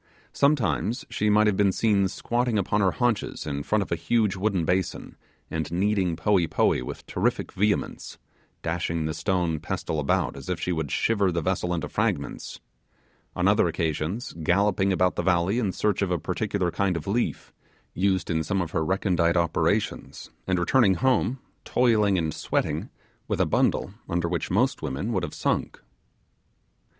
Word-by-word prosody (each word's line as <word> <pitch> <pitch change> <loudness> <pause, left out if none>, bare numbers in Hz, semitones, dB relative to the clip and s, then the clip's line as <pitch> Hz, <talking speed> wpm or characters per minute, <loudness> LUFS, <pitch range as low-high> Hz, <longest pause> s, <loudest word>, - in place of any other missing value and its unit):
Sometimes 120 - +1
she 105 - 0
might 105 +1 +5
have 105 -2 +3
been 100 0 +3
seen 100 -1 +2
squatting 120 +3 -1
upon 105 +1 +1
her 95 - +4
haunches 120 -4 -1
in 70 -2 -3
front 105 +7 +1
of - - -13
a - - +2
huge 100 +4 +1
wooden 95 -3 0
basin, 90 +1 -1 0.4
and 80 -1 -3
kneading 95 -1 +1
poee 90 0 +2
poee - - +2
with - - -7
terrific - - -1
vehemence, 105 +1 -1 0.5
dashing 85 -1 -1
the 80 - -2
stone 90 -4 0
pestle 80 - -3
about 75 -2 0
as 70 +5 -9
if 90 - -1
she 90 - -2
would 80 -4 -2
shiver 100 - +1
the 85 -2 -2
vessel 90 -1 -1
into 85 -2 -2
fragments; - - -2 0.8
on - - +1
other - - +4
occasions, 80 - -2
galloping 95 +3 +2
about 90 -1 +2
the - - +1
valley 90 +5 +2
in 105 -6 0
search 105 +1 0
of 100 - +1
a 90 - +1
particular 85 +2 -1
kind 95 -2 0
of 80 - -6
leaf, 110 +5 -2 0.4
used 95 -1 0
in 80 -1 +1
some 95 +5 -1
of 85 -3 -2
her 80 - 0
recondite 90 -1 +1
operations, 85 -1 -1 0.2
and 95 - +1
returning 95 +3 +3
home, 130 +1 +1 0.3
toiling 110 -6 +3
and 80 -3 -1
sweating, - - -2 0.4
with - - -1
a - - +4
bundle - - +2
of - - -11
it, - - -20 0.2
under 85 0 +1
which 85 -1 -2
most - - +1
women 85 - -3
would 95 - +1
have - - -5
sunk. - - -1
95 Hz, 175 wpm, -26 LUFS, 85-105 Hz, 0.8 s, might